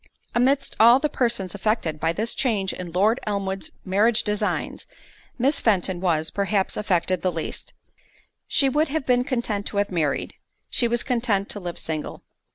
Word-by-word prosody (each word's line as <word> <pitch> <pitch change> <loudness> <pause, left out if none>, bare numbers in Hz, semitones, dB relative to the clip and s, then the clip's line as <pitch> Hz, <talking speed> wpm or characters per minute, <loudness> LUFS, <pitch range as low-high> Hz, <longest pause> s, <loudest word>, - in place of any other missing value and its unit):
Amidst 265 +3 +1
all 235 +3 +8
the 300 +2 0
persons 230 -8 0
affected 205 -6 -1
by 165 +1 +1
this 220 +7 -2
change 210 -7 0
in 180 -2 -7
Lord 210 +7 +2
Elmwood's 195 -2 -2 0.2
marriage 210 +4 +3
designs, 210 0 -2 0.5
Miss 275 +4 +2
Fenton 190 -4 +1
was, 160 -4 +1
perhaps, 200 -1 0
affected 185 -3 0
the 185 - +1
least—she 170 - -4
would 300 +4 +2
have 300 0 -2
been 250 -1 +3
content 235 -6 -2
to 205 - -5
have 200 0 +1
married, 155 -6 -1 0.4
she 240 - +3
was 235 0 +1
content 230 -6 0
to 205 - -5
live 175 -2 -6
single. 155 -2 -4
205 Hz, 160 wpm, -24 LUFS, 185-240 Hz, 0.5 s, all